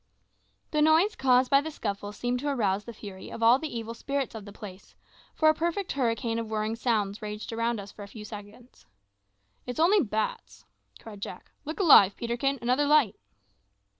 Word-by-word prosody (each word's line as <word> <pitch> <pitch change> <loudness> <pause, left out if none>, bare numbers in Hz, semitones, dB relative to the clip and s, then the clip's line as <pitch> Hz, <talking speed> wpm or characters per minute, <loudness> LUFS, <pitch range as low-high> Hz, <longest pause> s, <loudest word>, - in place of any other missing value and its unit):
The 300 - +1
noise 320 +7 +4
caused 255 -1 +3
by 275 0 +6
the 315 - -5
scuffle 205 -8 -4
seemed 245 +4 -2
to 290 - -4
arouse 210 -7 0
the 235 - -7
fury 200 -4 -10
of 230 - -5
all 235 +3 +6
the 315 - -4
evil 230 -1 -5
spirits 275 +3 -3
of 220 -3 -8
the 205 - -10
place, 195 -2 -11 0.4
for 315 - +3
a 310 - +7
perfect 340 +4 -2
hurricane 230 -3 -1
of 225 -1 -5
whirring 215 0 -1
sounds 215 -4 -1
raged 210 +1 -6
around 230 0 -1
us 200 0 -9
for - - -13
a 200 - -7
few 210 +1 -10
seconds. 210 - -12 0.8
"It's 250 +4 -5
only 375 +5 +5
bats," 220 -4 -3 0.3
cried 210 -3 -11
Jack. - - -8
"Look 310 +6 -6
alive, 205 - +7
Peterkin; 240 +4 -1
another 255 +4 +2
light." 285 -9 +4
230 Hz, 185 wpm, -28 LUFS, 210-280 Hz, 0.8 s, a